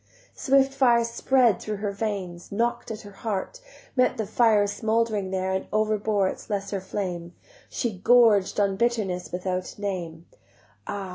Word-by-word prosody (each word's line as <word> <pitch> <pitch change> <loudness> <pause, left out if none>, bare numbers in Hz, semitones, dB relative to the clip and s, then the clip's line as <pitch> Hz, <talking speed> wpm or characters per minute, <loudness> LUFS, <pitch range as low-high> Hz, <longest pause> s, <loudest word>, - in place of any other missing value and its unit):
Swift 270 -1 +2
fire 240 -4 +4
spread 235 -1 +2
through 215 - -3
her 205 0 -3
veins, 195 -4 -4
knock'd 235 +4 -1
at 220 -1 -5
her 205 - -12
heart, 210 - -4 0.3
Met 255 0 +2
the 220 - -1
fire 215 -1 +3
smouldering 220 -1 0
there 190 0 -1
And 190 0 -2
overbore 215 -2 +1
its - - -6
lesser 200 -1 -2
flame; 180 -3 -5 0.3
She 220 -7 -3
gorged 220 -3 +4
on 200 -1 +1
bitterness 210 -6 -1
without 180 0 -3
a - - -12
name: 170 -5 -4 0.6
Ah! 200 -2 -4
205 Hz, 150 wpm, -25 LUFS, 190-230 Hz, 0.6 s, fire